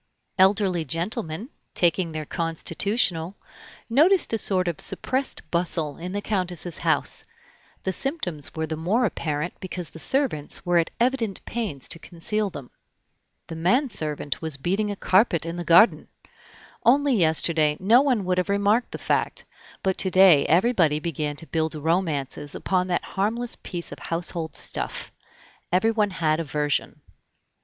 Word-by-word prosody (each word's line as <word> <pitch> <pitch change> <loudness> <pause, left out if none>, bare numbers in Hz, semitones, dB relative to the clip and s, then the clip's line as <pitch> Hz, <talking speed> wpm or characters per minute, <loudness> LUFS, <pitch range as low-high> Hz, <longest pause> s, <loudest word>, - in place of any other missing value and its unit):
Elderly 190 -3 +3
gentlemen, 170 - -3 0.3
taking 175 -1 +3
their 155 -1 -5
constitutional, 165 +3 -1 0.5
noticed 310 +7 +3
a - - +2
sort 185 -3 +3
of 170 -3 -2
suppressed 260 +1 -2
bustle 165 -4 0
in 180 +2 -6
the 205 +1 -3
Countess's 180 -4 -2
house; - - +2 0.6
the 190 - -1
symptoms 185 - -3
were 160 0 -2
the 160 0 -4
more 195 +10 +1
apparent 155 -4 -2
because 180 -5 -6
the 160 - -11
servants 255 - 0
were 175 -1 +3
at 165 - 0
evident 235 -5 0
pains 210 - -4
to 165 - -4
conceal 200 +6 -3
them. 140 -8 -10 0.7
The 165 - -8
man 240 - +2
servant 150 - -2
was 160 -4 0
beating 195 +9 -1
a 205 - -3
carpet 185 -3 +2
in 165 +1 -5
the 175 - -3
garden. 170 +8 +5 0.8
Only 275 +3 +4
yesterday 160 -4 +3
no 225 +7 +5
one 250 -9 +1
would 180 0 +1
have 180 - -2
remarked 205 +4 +1
the - - -4
fact, - - -1 0.4
but 190 -1 0
to 190 - +1
day 185 -6 +6
everybody 170 -4 +3
began 150 -2 -3
to 165 - -4
build 160 -1 -2
romances 150 -3 -1
upon 185 -1 0
that 175 -1 -1
harmless 225 +5 -1
piece 175 -2 -6
of - - -9
household 165 -1 -4
stuff. - - -3 0.6
Everyone 210 +3 +2
had 160 -4 0
a - - -1
version. 145 -1 -2
180 Hz, 150 wpm, -24 LUFS, 160-210 Hz, 0.8 s, day